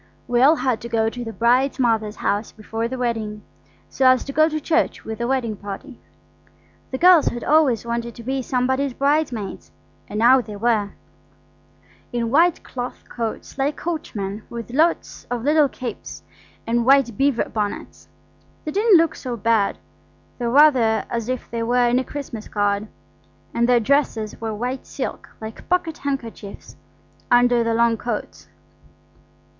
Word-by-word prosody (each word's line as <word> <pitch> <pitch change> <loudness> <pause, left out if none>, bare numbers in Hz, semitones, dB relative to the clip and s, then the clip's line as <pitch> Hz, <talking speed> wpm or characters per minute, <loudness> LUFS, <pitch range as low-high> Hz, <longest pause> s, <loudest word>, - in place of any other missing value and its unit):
We 245 0 +2
all 290 +5 +6
had 255 -7 -1
to 235 - -7
go 225 -1 +1
to 245 +1 -6
the 225 - -5
bride's 245 +4 +2
mother's 225 -4 +1
house 205 +1 -1
before 225 +1 -4
the 260 +2 -5
wedding, 220 -4 -3 0.4
so 260 - +2
as 255 0 +5
to 275 - -7
go 310 +2 +4
to 310 0 -2
church 330 +2 0
with 220 0 -6
the 235 - -1
wedding 245 -4 -1
party. 205 +7 -8 0.9
The 260 - -3
girls 350 -1 +6
had 240 - -2
always 280 -8 +3
wanted 235 0 -3
to 235 - -10
be 265 +2 -2
somebody's 260 +1 0
bridesmaids, 275 -8 -1 0.4
and 210 - -6
now 250 +4 +6
they 215 -3 -9
were–in 230 +2 -5
white 335 +4 +3
cloth 245 -1 -6
coats 230 +3 -5
like 285 +2 +1
coachmen, 220 - -4
with 235 0 -7
lots 320 +6 0
of 245 -2 -3
little 295 0 +4
capes, 250 -1 -7 0.4
and 235 +1 +1
white 265 -3 +4
beaver 275 0 +1
bonnets. 210 -2 -4 0.6
They 305 - -3
didn't 415 +1 +5
look 325 -1 +2
so 245 -3 -5
bad, 225 -2 +1 0.6
though 240 -1 -1
rather 245 -6 +4
as 235 0 -3
if 255 -1 -3
they 230 0 -2
were 245 +1 +2
in 245 +1 +3
a - - -1
Christmas 260 -6 -7
card; 205 0 0 0.7
and 235 +1 +1
their 245 -1 +5
dresses 225 -4 0
were 220 -1 -3
white 250 +4 -4
silk - - -5
like 220 0 -9
pocket 335 -3 0
handkerchiefs 235 -7 -6 0.5
under 245 -1 +4
the 230 0 0
long 230 0 +3
coats. 235 -1 -5
240 Hz, 160 wpm, -22 LUFS, 225-275 Hz, 0.9 s, all